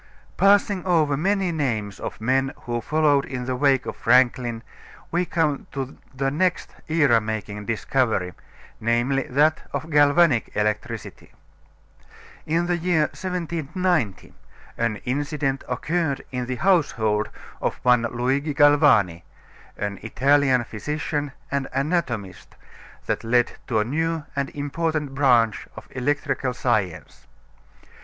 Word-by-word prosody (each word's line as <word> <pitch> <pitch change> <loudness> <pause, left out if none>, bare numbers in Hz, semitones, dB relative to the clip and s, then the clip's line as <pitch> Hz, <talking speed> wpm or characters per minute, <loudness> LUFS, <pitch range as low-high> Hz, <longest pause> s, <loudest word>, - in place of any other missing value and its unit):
Passing 200 -1 +3
over 160 -6 +2
many 190 +4 +1
names 115 - -2
of - - -6
men 130 +4 +1
who 120 -1 -3
followed 150 -1 +2
in 125 -3 -5
the 130 0 -2
wake 135 -1 +2
of - - -5
Franklin 120 -1 +2 0.5
we 175 +2 +1
come 155 -5 -1
to 135 -1 -4 0.2
the 135 0 -1
next 180 +4 0
era 145 -8 +3
making 105 -1 -5
discovery, 115 -5 0 0.5
namely, 120 +4 +1
that 150 +4 +3
of 160 - -4
galvanic 145 -2 +4
electricity. 105 0 -3 1.1
In 165 +2 +1
the 175 0 0
year 165 -3 +1
1790 175 - -2 0.4
an 115 -2 0
incident 140 +1 -1
occurred 150 +3 -1
in 125 -1 -3
the 130 - -2
household 115 - +1 0.3
of - - -1
one 125 -1 +5
Luigi 130 +5 -1
Galvani, 145 - +4 0.6
an 100 -1 -3
Italian 135 +2 +2
physician 145 +5 -3 0.2
and 140 -1 -1
anatomist, 130 - -2 0.5
that - - -2
led 120 +1 +2 0.2
to 115 - 0
a 105 - +2
new 160 +4 -1
and 140 -1 -1
important 150 0 -2
branch 120 -6 +3
of - - -10
electrical 130 -1 -1
science. 105 -11 -2
135 Hz, 120 wpm, -23 LUFS, 120-155 Hz, 1.1 s, one